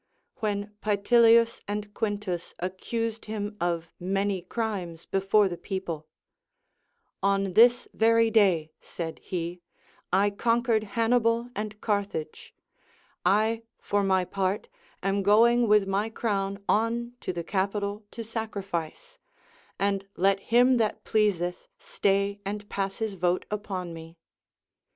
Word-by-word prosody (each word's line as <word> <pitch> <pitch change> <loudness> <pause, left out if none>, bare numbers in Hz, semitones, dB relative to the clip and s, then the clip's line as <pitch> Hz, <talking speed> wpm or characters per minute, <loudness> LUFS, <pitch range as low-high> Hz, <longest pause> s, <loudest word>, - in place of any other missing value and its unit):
When 205 -2 -2
Paetilius 230 +2 +4
and 205 0 -4
Quintus 205 -6 -3
accused 225 +5 -3
him 210 -1 -4
of 170 -1 -1
many 195 +1 0
crimes 185 -5 -4
before 195 +2 +3
the 175 -2 -5
people, 175 -6 -4 0.6
— - - -48 0.2
On 195 -2 -2
this 240 +4 +6
very 230 0 +4
day, 185 -8 +3
said 165 -2 -6
he, 175 -1 -4 0.5
I 200 +3 +3
conquered 230 +1 +1
Hannibal 230 +1 +2
and 210 0 -4
Carthage; 200 -7 -3 0.7
I 215 +5 +2 0.2
for 205 0 0
my 190 -1 +2
part 195 +1 -2 0.3
am 195 +1 +1
going 230 +4 +5
with 210 -2 +4
my 200 +3 0
crown 200 -3 -2
on 235 +2 +1
to - - -2
the 170 -1 -4
Capitol 200 +3 -2
to 230 - -7
sacrifice; 220 - -5 0.6
and 195 0 0
let 195 +2 +3
him 245 +4 +4
that 220 -3 0
pleaeeth 190 -5 0
stay 200 0 0
and 205 +1 -5
pass 195 -1 -2
his 220 -2 -2
vote 180 -1 0
upon 190 -4 -4
me. 165 +1 -11
205 Hz, 125 wpm, -27 LUFS, 190-225 Hz, 0.7 s, this